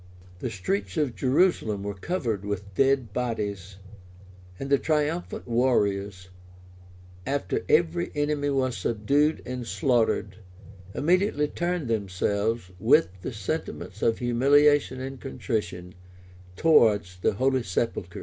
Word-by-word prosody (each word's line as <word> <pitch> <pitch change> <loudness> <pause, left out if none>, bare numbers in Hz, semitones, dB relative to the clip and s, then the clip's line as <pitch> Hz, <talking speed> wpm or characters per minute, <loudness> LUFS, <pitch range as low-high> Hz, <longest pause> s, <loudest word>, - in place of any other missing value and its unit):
[*] 90 0 -22
The 125 - -3
streets 95 -1 -3
of 145 -6 +1
Jerusalem 130 - +1
were 100 0 -3
covered 115 - -3
with 100 -1 -5
dead 135 -2 +2
bodies;[] 105 -6 -3 0.8
and 135 0 -5
the 140 - +5
triumphant 155 +2 -1
warriors, 100 -6 0 0.9
after 140 +7 -2
every 170 +2 +2
enemy 145 -1 0
was 130 -3 0
subdued 120 - +1
and 125 -1 -5
slaughtered, 115 - +1 0.6
immediately 175 -1 +2
turned 175 -2 -2
themselves, 100 0 -1
with 85 - +4
the - - -4
sentiments 105 - -5
of 115 - +2
humiliation 140 +3 +3
and 135 0 -6
contrition, 105 -9 -4 0.6
towards 105 - +3
the - - +1
holy 130 +4 +1
sepulchre. 95 -3 -3
120 Hz, 115 wpm, -26 LUFS, 100-145 Hz, 0.9 s, the